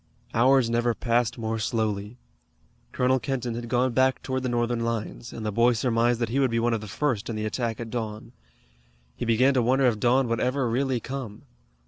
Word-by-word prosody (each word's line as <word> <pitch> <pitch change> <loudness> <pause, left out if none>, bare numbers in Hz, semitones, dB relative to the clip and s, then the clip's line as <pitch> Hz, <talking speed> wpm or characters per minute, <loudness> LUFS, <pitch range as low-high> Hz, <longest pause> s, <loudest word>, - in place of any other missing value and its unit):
Hours 130 +1 +4
never 120 0 +1
passed 120 -1 0
more 115 -1 -2
slowly. 105 0 -2 0.7
Colonel 130 +1 +2
Kenton 125 -2 -3
had 120 0 -6
gone 125 +1 +1
back 130 +1 +2
toward 130 0 -2
the 130 - -2
Northern 120 0 0
lines, 115 0 -4
and 110 - -7
the 105 - -1
boy 115 +3 +3
surmised 120 0 +1
that 115 - 0
he 130 +4 0
would 135 -2 +3
be 115 - -1
one 120 +1 +1
of 115 - -1
the 105 - -8
first 120 0 -1
in 115 - -3
the 110 0 -3
attack 115 0 -2
at 115 -1 -6
dawn. 110 -2 -5 0.8
He - - -4
began 125 +4 +3
to 130 - +2
wonder 130 +3 +2
if 115 -4 +2
dawn 125 +2 +3
would 115 0 -1
ever 130 +1 0
really 130 +2 0
come. 125 -4 -7
120 Hz, 205 wpm, -26 LUFS, 115-130 Hz, 0.8 s, Hours